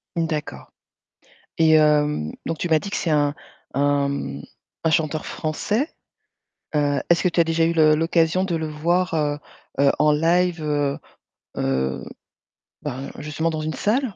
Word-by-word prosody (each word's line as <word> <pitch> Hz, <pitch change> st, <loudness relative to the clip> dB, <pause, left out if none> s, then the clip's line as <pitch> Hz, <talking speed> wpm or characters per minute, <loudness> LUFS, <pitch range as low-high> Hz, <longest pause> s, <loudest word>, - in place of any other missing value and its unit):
D'accord. 150 Hz, -, -3 dB, 0.9 s
Et 160 Hz, -1 st, +5 dB
hem, 150 Hz, -, +3 dB
donc 165 Hz, -, -2 dB
tu 175 Hz, -, -3 dB
m'as 160 Hz, -1 st, +4 dB
dit 200 Hz, -, -6 dB
que -, -, -3 dB
c'est 170 Hz, -, -1 dB
un 145 Hz, -1 st, +2 dB, 0.4 s
un, 140 Hz, 0 st, +2 dB
mmh, 70 Hz, -, -4 dB, 0.4 s
un 160 Hz, -, +3 dB
chanteur 155 Hz, -1 st, 0 dB
français, 210 Hz, -, -2 dB, 0.9 s
heu, 145 Hz, -2 st, +1 dB
est-ce 170 Hz, -, +4 dB
que 180 Hz, -, +3 dB
tu 170 Hz, -, -1 dB
as -, -, +7 dB
déjà 165 Hz, 0 st, +1 dB
eu 170 Hz, -, +1 dB
le 155 Hz, -2 st, +5 dB
l'occasion 165 Hz, +2 st, +2 dB
de 175 Hz, -3 st, -1 dB
le 160 Hz, -1 st, -2 dB
voir, 170 Hz, +4 st, 0 dB
heu, 145 Hz, -1 st, 0 dB, 0.4 s
heu, 140 Hz, 0 st, +5 dB
en 150 Hz, 0 st, +5 dB
live, 170 Hz, +2 st, +2 dB
heu, 145 Hz, -2 st, 0 dB, 0.6 s
heu, 65 Hz, 0 st, -1 dB, 0.8 s
ben, 135 Hz, -2 st, -5 dB
justement 150 Hz, +2 st, -2 dB
dans 155 Hz, -1 st, -3 dB
une 155 Hz, 0 st, -3 dB
salle? 230 Hz, 0 st, 0 dB
155 Hz, 160 wpm, -23 LUFS, 145-165 Hz, 0.9 s, as